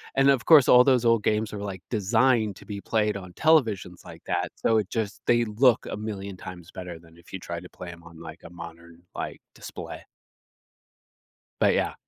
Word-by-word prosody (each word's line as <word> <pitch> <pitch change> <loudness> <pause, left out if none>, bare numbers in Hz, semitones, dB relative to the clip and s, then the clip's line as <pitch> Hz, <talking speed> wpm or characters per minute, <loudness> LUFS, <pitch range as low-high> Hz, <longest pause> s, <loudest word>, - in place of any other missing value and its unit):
and 135 +1 +4
of 135 -4 +3
course 150 -6 +7
all 125 0 +8
those 125 -2 +3
old 115 -2 +3
games 110 0 0
are, 105 - -5
like, 95 -3 -6
designed 110 0 +2
to - - -15
be 100 -1 -6
played 105 -1 0
on 95 -2 -8
televisions 110 - +1
like - - -12
that, - - -1
so 115 - +1
it 105 - -4
just 105 -3 -3
they 120 0 +3
look 115 +3 +3
a - - -4
million 100 -2 -6
times 90 -1 -10
better 90 -3 -8
than 80 0 -20
if 85 - -19
you 95 - -5
try 85 -1 -6
to 90 - -12
play 90 - -10
'em 85 -1 -12
on, 85 -1 -14
like, 80 0 -10
a - - -10
modern, 85 0 -12
like, - - -5 0.2
display. - - -9 1.6
But, - - +4
yeah. - - 0
100 Hz, 205 wpm, -26 LUFS, 90-115 Hz, 1.6 s, all